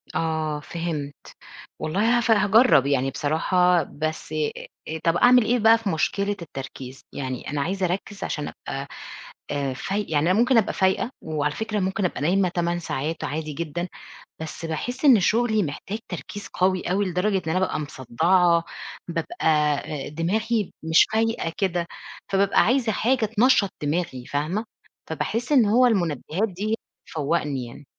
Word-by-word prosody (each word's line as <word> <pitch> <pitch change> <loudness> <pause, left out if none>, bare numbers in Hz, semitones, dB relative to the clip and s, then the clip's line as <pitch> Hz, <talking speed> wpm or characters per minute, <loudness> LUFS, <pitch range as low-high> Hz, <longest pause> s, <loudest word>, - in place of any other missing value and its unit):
آه، 160 -2 -1
فهمت، 150 -2 -4 0.6
والله 205 +10 +2
هف 235 -1 +1
هاجرّب 210 - +5
يعني 135 -1 +1
بصراحة، 175 +4 +2
بس 155 +2 -5
أ 155 -1 0 0.4
أ 160 +1 -4
طَب 165 +1 +2
أعمل 245 +3 +6
إيه 245 +2 +2
بقى 225 +1 +6
في 225 -3 -3
مشكلة 200 +4 0
التركيز، 135 -4 -8
يعني 130 -2 -4
أنا 145 0 -1
عايزة 190 +5 -1
أركّز 195 +3 -3
عشان 150 - -3 0.2
أبقى، 135 +1 -4 0.6
آآ، 140 -2 -1
فاي 195 +10 -2
يعني 155 +2 +2
أنا 190 - +3
ممكن 245 +1 +4
أبقى 220 - +2
فايقة 190 +5 +1
وعلى 150 -2 -1
فكرة 220 -1 -2
ممكن 190 +2 -1
أبقى 180 - -1
نايمة 180 +5 +2
8 175 0 -1
ساعات 160 -1 -3
عادي 155 +1 -3
جدًا، 170 +3 -4 0.5
بس 160 +1 -6
باحِس 245 - -3
إن 255 -6 +8
شغلي 220 +2 +2
محتاج 185 +7 -5
تركيز 205 -1 -7
قوي 185 0 +1
أوي 200 +2 +1
لدرجة 185 +3 0
إن 160 -4 -3
أنا 185 - +1
بابقى 190 - 0
مصدّعة، 165 +6 +2 0.4
بابقى 165 -2 -4 0.6
آآ، - - -6
دماغي 210 +7 -1
مش 160 0 +5
فايقة 225 -7 0
كده، 175 -3 0 0.4
فبابقى 195 0 +4
عايزة 245 -1 +2
حاجة 235 +3 +1
تنشّط 225 -2 +3
دماغي 150 -4 -2
فاهمة، 155 - -2 0.4
فباحِس 230 - -2
إن 260 -6 +6
هو 235 +5 +5
المنبّهات 180 - 0
دي، 205 +4 -2 0.3
هتفوقني 150 -4 -1
يعني. 125 +5 -12
175 Hz, 150 wpm, -24 LUFS, 155-210 Hz, 0.6 s, إن